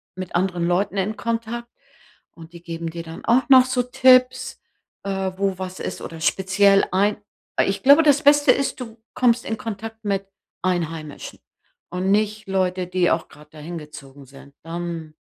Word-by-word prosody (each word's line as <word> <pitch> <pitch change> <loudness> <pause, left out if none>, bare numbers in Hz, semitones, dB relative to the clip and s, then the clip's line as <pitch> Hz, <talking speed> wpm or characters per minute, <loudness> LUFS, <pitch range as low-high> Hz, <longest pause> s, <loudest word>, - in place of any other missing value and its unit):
mit 185 -1 -7
anderen 175 -1 0
Leuten 190 +3 0
in 200 +3 -1
Kontakt, 230 +1 -4 0.6
und 165 0 -14
die 170 0 -12
geben 165 -1 -5
dir 165 +1 -7
dann 165 0 -10
auch 245 +4 +2
noch 260 -2 +8
so 255 -1 0
Tipps, 255 0 +3 0.4
äh, 195 -1 -2
wo 195 -1 -1
was 185 0 -6
ist - - -5
oder 165 -1 -8
speziell 195 +3 +3
ein 200 +3 +2 0.5
ich 195 0 -2
glaube, 285 +4 +7
das 290 -1 +3
Beste 290 0 +6
ist, 275 -1 -1
du 230 -2 -8 0.2
kommst 245 -1 +2
in 220 - -3
Kontakt 225 +1 -7
mit 195 -1 -1 0.4
Einheimischen 165 -5 -4 0.5
und 180 +2 -2
nicht 215 +1 0
Leute, 185 -1 -1
die 180 -1 +1
auch 165 - -1
gerade 150 0 -17
da 155 - -15
hingezogen 150 -4 -10
sind. 140 +1 -16
Ähm, 165 -2 -6
190 Hz, 165 wpm, -22 LUFS, 170-225 Hz, 0.6 s, noch